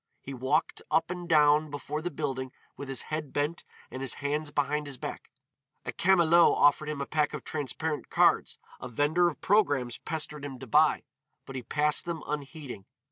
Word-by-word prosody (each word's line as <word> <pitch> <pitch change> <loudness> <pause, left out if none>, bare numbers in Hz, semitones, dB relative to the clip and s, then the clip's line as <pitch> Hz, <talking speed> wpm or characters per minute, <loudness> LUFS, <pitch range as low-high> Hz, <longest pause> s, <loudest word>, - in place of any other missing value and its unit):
He 135 - -8
walked 130 0 0
up 165 - +1
and 180 -1 -6
down 150 -1 +5
before 145 +1 -4
the 175 - -2
building 130 -4 -3 0.2
with 140 - -8
his 135 - -2
head 155 -3 -3
bent 150 +4 -1 0.3
and 130 - -6
his 135 - -3
hands 145 +1 -2
behind 145 +1 -1
his 140 -2 -6
back. - - -7 0.6
A - - -2
camelot 170 -2 +5
offered 150 +1 +4
him 150 -2 -3
a - - -2
pack 150 -1 0
of - - -7
transparent 150 +1 -3
cards, - - +3 0.2
a - - -7
vender 155 +8 +2
of 150 - -10
programmes 145 - +2
pestered 150 -2 -4
him 140 -2 -6
to 130 - -9
buy, 150 +5 +3 0.4
but 135 - -9
he 130 - -3
passed 150 +6 +1
them 170 -2 -4
unheeding. 145 - -6
150 Hz, 185 wpm, -29 LUFS, 140-155 Hz, 0.6 s, down